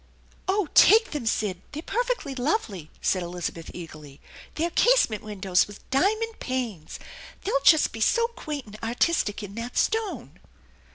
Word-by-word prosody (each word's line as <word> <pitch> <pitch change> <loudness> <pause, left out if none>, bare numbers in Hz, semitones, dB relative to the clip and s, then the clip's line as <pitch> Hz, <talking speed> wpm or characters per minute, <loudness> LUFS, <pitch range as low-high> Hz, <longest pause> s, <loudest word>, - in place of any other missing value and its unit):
"Oh, 385 -1 +1
take 445 +5 +6
them, 285 -7 -4
Sid! 195 -5 -1
They're 305 +2 -5
perfectly 480 - -2
lovely," 245 - -2
said 185 - +2
Elizabeth 170 -1 -5
eagerly. 155 -5 -10 0.2
" - - -18
They're 335 +2 -1
casement 470 - +3
windows 195 -3 +1
with 205 0 -14
diamond 435 +10 +1
panes. 235 - -4 0.5
They'll 275 -8 0
just 315 +1 +6
be 225 - -7
so 465 - +3
quaint 305 - -6
and 215 0 -12
artistic 230 -2 0
in 200 -1 -8
that 230 +3 -6
stone 440 -2 -1
250 Hz, 150 wpm, -26 LUFS, -, 0.5 s, take